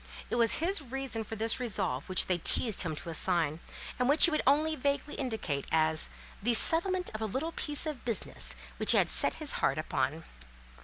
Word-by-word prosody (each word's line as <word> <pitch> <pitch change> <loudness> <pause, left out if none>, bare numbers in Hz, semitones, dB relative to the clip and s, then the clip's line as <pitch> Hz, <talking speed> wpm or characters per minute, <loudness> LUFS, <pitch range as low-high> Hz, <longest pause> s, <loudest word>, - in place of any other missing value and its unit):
It - - -1
was 230 -2 +4
his 355 +2 0
reason 265 -3 -5
for 225 - -8
this 225 +2 0
resolve 190 - -4
which 185 - +3
they 180 -2 -1
teased 215 +4 +1
him 160 -4 -3
to 165 - -7
assign, 165 -2 +1 0.4
and 250 +1 0
which 295 +2 +5
he 345 - 0
would 310 - 0
only 310 +3 +2
vaguely 285 +1 -3
indicate 220 - -4
as 160 0 +1 0.3
"the 235 +3 +2
settlement 360 - +6
of 215 - -7
a 220 - -2
little 275 +10 -4
piece 295 -2 -1
of 300 -5 -6
business 180 - -2 0.2
which - - +4
he - - +3
had - - +2
set - - +3
his - - -3
heart - - 0
upon." - - -3
235 Hz, 200 wpm, -29 LUFS, 180-290 Hz, 0.4 s, settlement